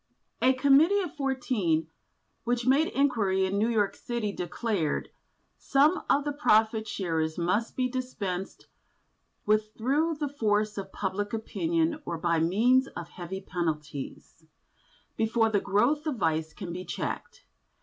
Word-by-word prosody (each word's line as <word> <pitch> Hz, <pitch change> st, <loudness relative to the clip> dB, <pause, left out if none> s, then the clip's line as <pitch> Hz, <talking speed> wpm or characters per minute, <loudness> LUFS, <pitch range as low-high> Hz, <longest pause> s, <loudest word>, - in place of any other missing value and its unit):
A 260 Hz, -, +5 dB
Committee 285 Hz, +9 st, +5 dB
of 350 Hz, -, -7 dB
Fourteen, 245 Hz, -, 0 dB, 0.6 s
which 240 Hz, 0 st, -1 dB
made 275 Hz, +5 st, +4 dB
inquiry 210 Hz, -9 st, +1 dB
in 195 Hz, +2 st, -1 dB
New 220 Hz, +3 st, +2 dB
York 210 Hz, -4 st, +1 dB
City, 235 Hz, -4 st, -3 dB
declared: 180 Hz, -2 st, -2 dB, 0.5 s
"Some 295 Hz, +6 st, +3 dB
of 285 Hz, -, +3 dB
the 295 Hz, -, 0 dB
profit 220 Hz, -6 st, +2 dB
sharers 160 Hz, -4 st, -2 dB
must 185 Hz, +7 st, 0 dB
be 255 Hz, -1 st, +1 dB
dispensed 210 Hz, -8 st, -4 dB, 0.8 s
with 215 Hz, 0 st, +2 dB
through 295 Hz, +8 st, +1 dB
the 295 Hz, -1 st, -2 dB
force 215 Hz, -6 st, 0 dB
of 195 Hz, 0 st, -7 dB
public 205 Hz, +2 st, -3 dB
opinion 320 Hz, +7 st, -1 dB
or 170 Hz, -, -4 dB
by 170 Hz, 0 st, +1 dB
means 230 Hz, +11 st, +3 dB
of 170 Hz, -1 st, -8 dB
heavy 185 Hz, +2 st, -7 dB
penalties, 155 Hz, -4 st, -5 dB, 0.7 s
before 225 Hz, 0 st, +2 dB
the 205 Hz, -2 st, +2 dB
growth 280 Hz, +10 st, +1 dB
of 300 Hz, -, 0 dB
vice 160 Hz, -5 st, 0 dB
can 180 Hz, -4 st, -7 dB
be 180 Hz, +1 st, -5 dB
checked. -, -, -5 dB
215 Hz, 140 wpm, -28 LUFS, 185-265 Hz, 0.8 s, A